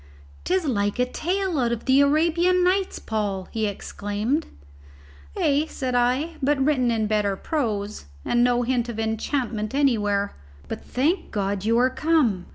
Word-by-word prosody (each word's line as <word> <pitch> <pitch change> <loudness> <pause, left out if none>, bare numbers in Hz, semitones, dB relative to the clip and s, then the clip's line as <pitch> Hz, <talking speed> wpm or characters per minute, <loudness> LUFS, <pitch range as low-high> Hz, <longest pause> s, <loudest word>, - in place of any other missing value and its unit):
"'Tis 370 -1 +1
like 205 -7 0
a 250 - +2
tale 360 +4 -1
out 240 -2 +1
of 235 -1 -3
the 265 +1 +5
Arabian 335 +5 +3
Nights, 375 +1 +1
Paul," 205 -4 -3
he 220 -1 -1
exclaimed. 205 +8 -2 0.9
"Ay," 290 +2 +2
said 260 -3 -3
I, 255 +7 +1
"but 285 +2 +2
written 265 -3 +2
in 225 -2 +1
bitter 210 -2 +1
prose, 215 - -3 0.2
and 240 0 +2
no 245 0 +2
hint 245 -1 0
of 225 -2 -5
enchantment 220 0 -2
anywhere. 205 -8 +1 0.3
But, - - -6
thank 325 +8 0
God, 200 -1 -2
you 230 +1 +3
are 255 +2 +3
come! 260 - +1
245 Hz, 155 wpm, -24 LUFS, 215-295 Hz, 0.9 s, the